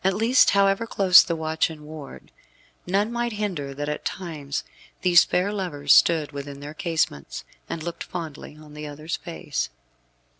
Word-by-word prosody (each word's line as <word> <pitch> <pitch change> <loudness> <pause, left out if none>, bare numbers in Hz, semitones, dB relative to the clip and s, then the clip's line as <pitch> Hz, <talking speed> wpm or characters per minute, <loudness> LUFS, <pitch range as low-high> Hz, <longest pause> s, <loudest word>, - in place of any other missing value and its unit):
At 190 0 +2
least, 230 +5 +4
however 200 +3 +3
close 190 -4 +7
the 170 - -2
watch 160 0 0
and 155 -2 -10
ward, 150 -2 -10 0.6
none 200 +5 +1
might 240 -1 -2
hinder 175 -10 -3
that 145 +1 -4
at 150 - -3
times 150 -6 -4 0.4
these 180 -2 +7
fair 190 +3 0
lovers 145 -8 +1
stood 160 -4 +4
within 140 -1 -7
their 145 +1 -8
casements, 160 - -2 0.3
and 160 - -4
looked 170 0 -5
fondly 155 -3 -7
on 150 -1 -14
the 150 0 -7
other's 155 +3 -5
face. 145 - -4
160 Hz, 160 wpm, -24 LUFS, 150-190 Hz, 0.6 s, close